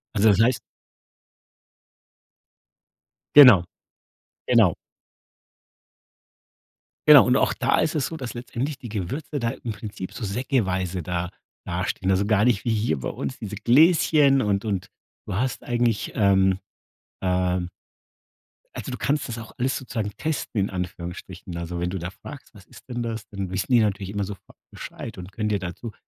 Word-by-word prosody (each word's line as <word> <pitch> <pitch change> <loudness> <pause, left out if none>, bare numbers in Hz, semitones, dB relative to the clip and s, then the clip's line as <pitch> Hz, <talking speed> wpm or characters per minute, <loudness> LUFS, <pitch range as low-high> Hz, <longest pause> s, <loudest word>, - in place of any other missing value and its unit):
Also, 105 +1 +5
das 100 - +4
heißt 120 +1 +3 2.8
Genau. 125 -11 +10 0.9
Genau. - - +5 2.3
Genau 150 -3 +10
und 125 +1 +3
auch - - +2
da - - +1
ist 160 - +1
es 145 - 0
so, 160 - -6
dass 125 -6 -6
letztendlich 125 +4 -4
die 120 - -8
Gewürze 125 - -4
da 115 -2 0
im 115 - -6
Prinzip 105 -3 -7
so 115 - -8
säckeweise 95 - -1
da 90 +1 -3 0.4
dastehen. 95 - -2
Also, 95 +2 +2
gar 105 +1 +3
nicht 115 -4 +1
wie 115 - +1
hier 105 - 0
bei 65 - -3
uns, 130 - -5
diese 105 -2 -6
Gläschen 145 +1 +4
und 100 -1 0
und 100 -2 -2 0.4
du - - -3
hast 125 +3 -2
eigentlich, 120 -3 0
ähm, 95 -2 +3 0.6
ähm 90 -1 0 1.1
Also - - -6
du - - -4
kannst 145 -2 -1
das 115 - -4
auch 115 - -9
alles 130 +1 0
sozusagen 110 -5 -4
testen, 155 -8 -2
in 100 - 0
Anführungsstrichen. 90 -1 -6
Also, 85 0 -5
wenn 85 - -1
du 95 - -3
da 90 +1 -5
fragst, 140 +5 -12
was 100 -3 -16
ist - - -17
denn 120 -1 -3
das, 115 -2 -4
dann 100 -2 -5
wissen 95 +6 -3
die 120 - +6
natürlich 100 -2 0
immer 100 -1 -2
sofort 100 -1 -11
Bescheid - - -8
und 90 +2 -9
können 105 +1 -3
dir 100 -2 0
dazu 95 +5 -7
105 Hz, 160 wpm, -24 LUFS, 95-125 Hz, 2.8 s, Genau